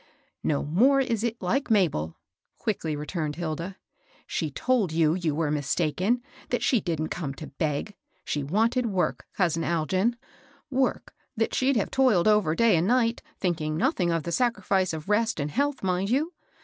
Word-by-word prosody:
"No 145 -2 0
more 245 - +4
is 230 -5 0
it 235 0 -2
like 255 +11 0
Mabel," 160 - +1 0.4
quickly 165 -8 -2
returned 150 0 -3
Hilda. 170 +3 -4 0.3
'* - - -32
She 160 - 0
told 220 - +1
you 160 -1 +3
you 170 -4 -1
were 155 -2 0
mistaken, 170 - 0
— - - -22
that - - 0
she 245 -7 +3
didn't 160 -3 -2
come 145 -6 -4
to 155 - -9
heg. 155 +6 -1 0.3
She 150 - -1
wanted 225 - +1
work, 190 -4 -1
cousin 170 -4 +2
Algin, 185 +8 +1 0.3
— 310 - -31
work 260 - -1 0.2
that 225 - 0
she'd 265 +1 +2
have 210 - 0
toiled 250 -9 +3
over 210 -7 +3
day 230 -2 +4
and 165 +3 +1
night, 235 -1 +2 0.2
thinking 155 -4 -1
nothing 210 - +1
of 165 -2 0
the 170 - -4
sacrifice 195 -4 +1
of 155 -1 -6
rest 220 -1 +1
and 145 +1 -2
health, 285 - 0
mind 185 +1 0
you 300 +8 +1
185 Hz, 175 wpm, -26 LUFS, 155-230 Hz, 0.4 s, more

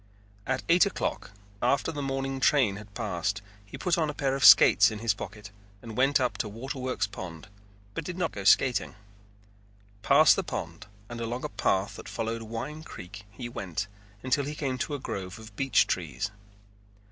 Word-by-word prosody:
At 130 - -1
eight 175 +4 +5
o'clock, 200 - -3 0.3
after 140 +5 +2
the 145 -2 -4
morning 135 0 -2
train 130 -8 +3
had 105 -1 -12
passed, 100 -3 -2 0.2
he 100 - -10
put 180 -2 +1
a 155 -2 0
pair 135 -2 0
of 135 - -2
skates 105 +3 +8
in 110 - -6
his 110 -1 +1
pocket 100 +1 -9 0.3
and 110 +1 -9
went 135 +3 +3
up 125 -1 -1
to 105 - -1
Waterworks 130 +3 -3
Pond 95 -2 -8 0.5
but 165 - -4
did 175 +3 -6
not 180 -3 0
go 100 - -6
skating. 125 +5 +3 1.1
Past 140 +7 +6
the 195 - -1
pond 85 - -6 0.2
and 120 +1 -7
along 120 +2 -3
a - - -3
path 100 0 0
that - - -9
followed 115 0 -3
Wine 115 +8 -6
Creek 105 - -10
he 120 +4 -7
went 105 -3 -4 0.4
until 130 +2 +1
he 150 +2 -5
came 130 -4 -2
to 145 - -2
a - - -5
grove 95 -4 -5
of 110 -1 -12
beech 135 +4 +3
trees. 85 +1 -3
115 Hz, 180 wpm, -28 LUFS, 100-135 Hz, 1.1 s, skates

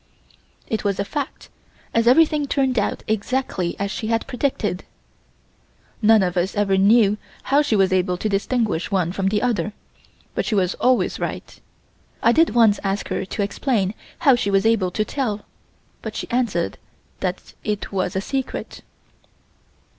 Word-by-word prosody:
It 220 - -2
was 200 -2 0
a 200 - 0
fact 275 +7 -5 0.4
as 230 0 +2
everything 300 +2 +4
turned 265 -4 +1
out 205 - -2
exactly 215 -4 -1
as 200 0 -2
she 215 - -4
had 225 0 0
predicted. 245 -8 -2 1.2
None 220 -1 +6
of 180 -1 -1
us 180 +4 0
ever 205 -2 +2
knew 205 +1 +4 0.2
how 280 +2 +3
she 290 -7 +1
was 190 -2 +3
able 180 -1 +1
to 215 - -2
distinguish 210 -2 0
one 185 -4 +1
from 190 +1 -1
the 210 +2 +1
other, 210 -5 0 0.6
but - - -1
she 220 - -1
was 185 -2 +2
always 255 0 +2
right. - - -5 0.6
I 230 - +6
did 325 +1 +3
once 225 -3 +5
ask 195 0 -2
her - - -2
to 200 - -2
explain 205 -2 0 0.3
how 275 - +8
she 220 -4 -1
was 195 0 +2
able 225 -5 +3
to 215 +4 -1
tell 215 -7 -3 0.6
but - - -6
she - - -4
answered 235 -9 0 0.4
that 185 -1 -4
it 210 -1 -3
was 185 -2 -1
a 190 - 0
secret. 265 +5 -4
210 Hz, 160 wpm, -22 LUFS, 195-240 Hz, 1.2 s, how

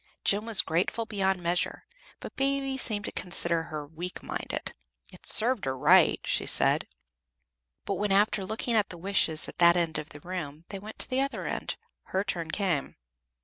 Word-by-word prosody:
Jem 210 +3 +2
was 225 -4 +3
grateful 180 +7 -1
beyond 190 -4 -1
measure, 175 +1 -1 0.4
but - - -9
Baby 275 0 -1
seemed 215 -6 0
to - - -4
consider 170 -2 +1
her 155 -3 -6
weak 165 +4 -8
minded. - - -5 0.4
"It - - -14
served 240 0 +6
her 130 0 -2
right," 170 +6 +5
she - - -1
said. - - +3 1.0
"But 195 - -3
when, 205 -1 -1
after 200 0 +2
looking 220 +4 -3
at 210 -2 +2
the 175 - -8
wishes 170 -4 +1
at - - -11
that 170 0 +6
end 165 -3 -1
of 150 +1 -8
the 145 - -12
room, 160 -2 -7
they 195 - -6
went 215 +3 -10
to - - +2
the 260 +1 0
other 275 0 -3
end, - - -3 0.3
her 190 +1 -1
turn 175 -5 -4
came. 175 -6 -1
185 Hz, 185 wpm, -28 LUFS, 165-210 Hz, 1.0 s, served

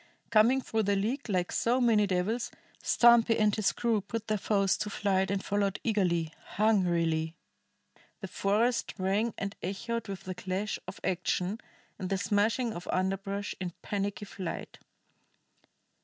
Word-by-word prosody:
Coming 230 +4 +5
through 225 -3 -1
the 200 -1 +1
leek 235 +7 -2
like 180 -3 0
so 245 +2 +2
many 220 -4 +4
devils, 200 +6 0 0.3
Stumpy 235 -1 +5
and 210 -2 +3
his 215 -3 +2
crew 230 -3 0
put 225 +3 -5
their 215 -2 0
foes 195 -1 +2
to 210 - -3
flight 190 -2 +1
and 200 0 -1
followed 200 -1 0
eagerly, 175 -8 +1 0.2
hungrily; 170 -6 +2 0.8
the 195 - -6
forest 210 +6 +1
rang 200 +4 +1
and 200 +1 -4
echoed 225 +6 -3
with 195 -2 -6
the 185 - -4
clash 185 +3 -3
of - - -7
action 185 +2 -1 0.4
and 185 - -3
the 195 - +1
smashing 215 +4 +1
of 175 - -8
underbrush 195 +2 -1
in 180 -3 -4
panicky 205 0 -2
flight. 190 -3 -6
200 Hz, 145 wpm, -30 LUFS, 185-220 Hz, 0.8 s, Coming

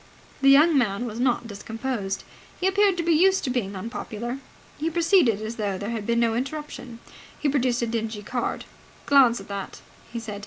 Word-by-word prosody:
The 275 - +6
young 300 +4 +6
man 235 -3 +1
was 225 -1 -5
not 245 -1 +1
discomposed. 220 -1 -4 0.4
He 360 - -1
appeared 390 -1 +3
to 340 - -1
be 335 - +2
used 380 +4 +4
to 255 - -1
being 205 -6 -2
unpopular. 230 +4 -5 0.4
He 315 +2 0
proceeded 330 - +3
as 220 +2 -5
though 200 -3 -1
there 205 +4 -4
had 220 -3 -4
been 235 0 +2
no 230 -1 +2
interruption. 265 -1 -5 0.4
He 300 - 0
produced 255 -4 +1
a - - +2
dingy 225 -2 -3
card. 245 +3 -3 0.4
"Glance 260 -5 +5
at 195 - -11
that," 200 -1 -6 0.3
he 235 - -4
said. 210 -3 -6
240 Hz, 190 wpm, -25 LUFS, 220-280 Hz, 0.4 s, The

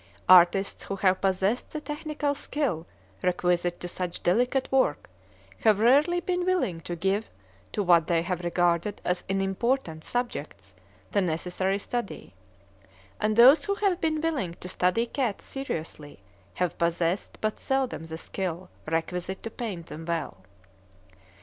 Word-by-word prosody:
Artists 185 +2 +6
who 195 - -3
have 190 -1 +2
possessed 195 +4 +1
the 305 - -4
technical 300 -1 -2
skill 275 - -2 0.3
requisite 175 -1 +1
to 175 - -4
such 180 0 -4
delicate 245 +8 +1
work 260 - +1 0.5
have 215 -2 +4
rarely 285 +10 +4
been 355 0 -1
willing 355 - 0
to 175 - -5
give 195 +5 -1 0.4
to 205 - -1
what 170 -3 +5
they 165 -1 +2
have 180 0 -2
regarded 175 +3 +1
as 180 0 0
unimportant 195 -2 -1
subjects 145 - -4 0.4
the 200 - +2
necessary 180 +3 -1
study; 235 - -5 0.9
and 215 0 +1
those 255 +7 +8
who 400 - 0
have 390 -3 0
been 315 -1 +1
willing 275 - -1
to 180 - -9
study 185 +6 +1
cats 240 -3 -2
seriously 160 - -6 0.4
have 180 -2 -1
possessed 170 +2 0
but 215 0 -2
seldom 265 -11 -1
the 160 0 -6
skill 180 0 -5 0.2
requisite 180 +4 -2
to 225 - -5
paint 205 -10 -5
them 155 +1 -8
well. 165 - -3
190 Hz, 140 wpm, -27 LUFS, 175-250 Hz, 0.9 s, those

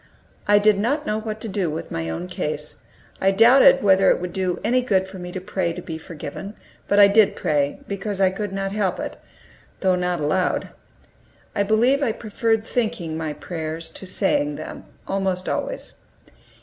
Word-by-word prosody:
I 205 0 +6
did 205 -1 +4
not 285 +8 0
know 215 -4 -1
what 220 -1 -5
to - - -5
do 195 -4 -1
with 155 +1 -5
my 80 0 -3
own 80 +2 -4
case. - - -4 0.4
I 195 - +4
doubted 230 +7 +6
whether 195 -1 +5
it - - +3
would 180 0 -5
do 185 -2 -1
any 250 +3 +2
good 190 -6 +1
for 190 0 -10
me 180 0 -7
to 185 - -4
pray 185 -2 -2
to 180 - -7
be 160 -1 -6
forgiven, 165 +5 -8 0.3
but 200 - +2
I 200 - +9
did 205 +1 +4
pray, 145 -4 0
because 200 0 -4
I 190 -1 +4
could 205 +1 -4
not 195 0 -3
help 195 -3 -1
it, - - -5 0.6
though 190 -1 +3
not 180 -1 -1
aloud. 155 +5 0 0.9
I - - +1
believe 230 +7 +3
I 240 -6 +1
preferred 225 0 -1
thinking 215 -10 -2
my 160 -1 -3
prayers 160 0 -5
to 190 - -10
saying 165 -6 +1
them, - - -8 0.2
almost 190 -2 -1
always. - - -3
195 Hz, 185 wpm, -23 LUFS, 175-215 Hz, 0.9 s, I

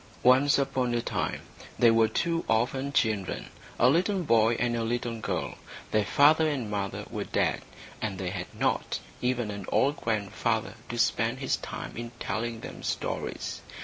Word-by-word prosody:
Once 130 +3 +6
upon 130 -3 0
a 120 - +1
time - - -2 0.4
there 115 -1 +6
were 115 -1 +5
two 165 +9 0
orphan 130 +5 +1
children, 110 -8 0 0.3
a 120 - +5
little 180 +7 +2
boy 115 -5 +4
and 120 0 0
a 115 - -1
little 115 0 -2
girl. - - -3 0.3
Their 110 -1 +2
father 155 +4 +5
and 125 -8 -3
mother 100 -1 -3
were - - -2
dead, - - 0 0.4
and 105 -3 -2
they 90 -1 -3
had 95 -2 -4
not - - 0 0.2
even 125 -3 0
an 100 -2 -7
old 140 +2 +3
grandfather 110 +1 -1 0.2
to 120 - -4
spend 115 +1 +2
his 135 -1 0
time - - -7
in 120 +1 -5
telling 115 +2 -3
them - - -8
stories. - - -3
120 Hz, 165 wpm, -28 LUFS, 110-130 Hz, 0.4 s, Once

